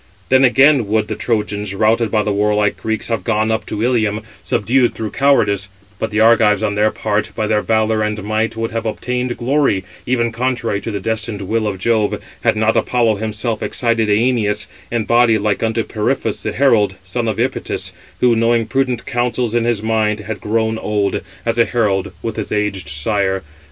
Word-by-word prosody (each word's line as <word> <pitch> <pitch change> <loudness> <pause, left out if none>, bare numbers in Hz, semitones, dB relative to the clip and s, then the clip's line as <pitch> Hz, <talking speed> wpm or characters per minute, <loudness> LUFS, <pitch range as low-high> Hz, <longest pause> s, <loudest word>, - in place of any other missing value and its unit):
Then 130 0 +5
again 135 -1 +5
would 110 0 0
the - - -2
Trojans, 105 -3 -2
[routed] 110 +2 +2
by 105 0 +1
the 105 - -1
warlike 105 0 +1
Greeks, 110 -1 -3
have 115 - -1
gone 110 -1 +1
up 110 -3 -2
to 105 +1 -3
Ilium, 110 -4 +1 0.2
subdued 120 +3 +1
through 110 -2 -4
cowardice; 105 -8 +2 0.3
but 110 - -2
the 105 +1 -1
Argives 110 -1 +4
on 105 -1 0
their 105 +1 +2
part, 105 -1 -1
by 110 - -1
their 105 0 +1
valour 110 0 +1
and 105 -1 -2
might, 110 +2 -1
would 115 0 -3
have 115 0 -3
obtained 125 +2 -2
glory, 130 -6 +1 0.2
even 120 -2 +1
contrary 115 -3 -1
to - - -5
the 100 -2 -3
destined 110 0 -3
will 110 +3 -1
of 100 -2 -3
Jove, 110 +1 +1 0.2
had - - +3
not 110 +1 +2
Apollo 115 -4 +2
himself 110 +1 -2
excited 115 -3 0
Æneas, 105 -1 +2 0.2
in 115 -2 -1
body 120 0 +4
like 105 -1 -1
unto 115 0 0
Periphas 110 +7 -1
the - - -2
herald, 115 -8 +3
son 115 +6 -3
of 110 - -1
Epytis, - - -1 0.3
who 125 -2 +4
knowing 115 0 +2
prudent 130 0 -1
counsels 120 -2 -1
in 120 -1 +1
his 115 -3 0
mind, 110 -1 0
had 105 0 -6
grown 110 +1 0
old, 105 -2 -1 0.2
as 115 0 0
a 115 - +6
herald, 100 -4 0
with 115 - -4
his 110 - -4
aged 105 -6 -1
sire. 95 +5 -1
110 Hz, 185 wpm, -18 LUFS, 105-115 Hz, 0.3 s, a